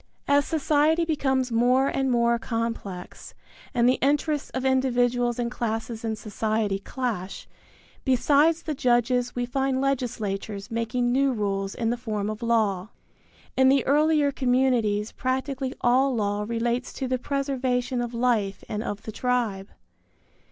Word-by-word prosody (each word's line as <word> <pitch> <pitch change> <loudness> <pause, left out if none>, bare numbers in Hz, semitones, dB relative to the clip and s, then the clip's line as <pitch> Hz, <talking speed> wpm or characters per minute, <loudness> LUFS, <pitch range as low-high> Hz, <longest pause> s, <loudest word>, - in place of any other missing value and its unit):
As 285 0 +4
society 315 +2 +2
becomes 265 -5 0
more 250 +4 +3
and 270 -1 0
more 235 -1 +2
complex 225 -6 -5 0.4
and 240 -1 +2
the 255 - +3
interests 290 +1 +1
of 260 0 -4
individuals 245 -2 +2
and 240 -1 -2
classes 225 -1 -3
in 220 -1 -1
society 215 -1 -1
clash, 210 -5 -4 0.6
besides 295 +5 +3
the 310 - -2
judges 245 -1 +1
we 245 0 -1
find 265 +1 0
legislatures 220 -7 -2
making 240 +2 0
new 270 +2 +3
rules 195 -3 -2
in 230 -1 0
the 240 - -1
form 215 -3 -2
of 215 +2 -7
law. 215 -5 +1 0.7
In 260 0 +5
the 275 -1 +3
earlier 300 0 +3
communities 245 -5 +1
practically 260 +1 -2
all 255 +2 +3
law 205 -1 -1
relates 235 +2 -1
to 265 - -3
the 255 0 -1
preservation 260 -2 -1
of 240 -1 -3
life 230 -5 0
and 210 - -3
of 205 -3 -5
the 220 - -6
tribe. 225 -5 -1
245 Hz, 140 wpm, -25 LUFS, 225-265 Hz, 0.7 s, In